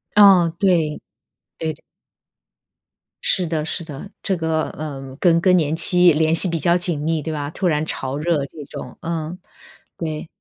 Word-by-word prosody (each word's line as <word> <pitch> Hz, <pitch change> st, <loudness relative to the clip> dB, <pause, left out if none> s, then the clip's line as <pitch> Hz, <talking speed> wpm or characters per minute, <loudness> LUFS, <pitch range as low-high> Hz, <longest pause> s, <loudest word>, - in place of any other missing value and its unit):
嗯， 190 Hz, -5 st, +6 dB
对， 170 Hz, -6 st, +1 dB, 0.6 s
对。 160 Hz, -2 st, -3 dB, 1.5 s
是 185 Hz, -3 st, +1 dB
的 155 Hz, -2 st, -2 dB
是 165 Hz, -, -4 dB
的， 155 Hz, +5 st, -9 dB
这 195 Hz, -, 0 dB
个， 160 Hz, -1 st, -1 dB
呃， 135 Hz, -3 st, -7 dB
跟 170 Hz, -2 st, +4 dB
更 185 Hz, -1 st, +4 dB
年 155 Hz, -1 st, 0 dB
期 180 Hz, 0 st, +6 dB
联 160 Hz, +1 st, +2 dB
系 175 Hz, +3 st, +6 dB
比 165 Hz, -1 st, -2 dB
较 170 Hz, +4 st, +3 dB
紧 175 Hz, -4 st, -2 dB
密， 160 Hz, 0 st, -1 dB
对 160 Hz, +1 st, -4 dB
吧， 145 Hz, -1 st, -4 dB
突 180 Hz, +3 st, -2 dB
然 155 Hz, -1 st, 0 dB
潮 135 Hz, -2 st, -4 dB
热 155 Hz, -2 st, 0 dB
这 150 Hz, +1 st, -11 dB
种， -, -, -9 dB
嗯， 165 Hz, +1 st, -4 dB, 0.6 s
对。 155 Hz, -1 st, -5 dB
160 Hz, 175 characters per minute, -20 LUFS, 150-175 Hz, 1.5 s, 嗯